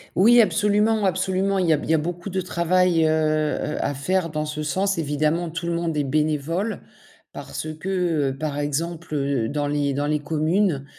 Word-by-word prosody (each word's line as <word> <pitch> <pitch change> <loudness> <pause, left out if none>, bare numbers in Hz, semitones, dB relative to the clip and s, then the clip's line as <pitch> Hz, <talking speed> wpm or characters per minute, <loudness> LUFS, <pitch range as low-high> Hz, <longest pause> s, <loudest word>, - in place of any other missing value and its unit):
Oui, 235 +6 +6
absolument, 210 0 +2
absolument, 190 +1 0
il 185 -2 +1
y 160 - +5
a - - +2
b - - -7
il - - -8
y - - +5
a - - +4
beaucoup 175 +5 -4
de 190 0 -1
travail, 175 -1 +2
heu - - +3
heu, 155 -1 0
à 145 - -1
faire 170 +5 -1
dans 155 0 -2
ce 150 0 -5
sens, 190 +5 0
évidemment, 155 +2 0
tout 165 +1 -5
le - - 0
monde 170 -1 -2
est 150 - +1
bénévole 155 +8 -1 0.5
parce 155 - -6
que, 175 -7 0
heu, 135 - -8
par 145 -1 -3
exemple, 160 +2 -3
heu, 140 -5 0
dans 145 +1 -2
les 145 -1 0
dans 145 +1 -1
les 150 0 +1
communes, 155 +1 0
160 Hz, 200 wpm, -23 LUFS, 150-185 Hz, 0.5 s, Oui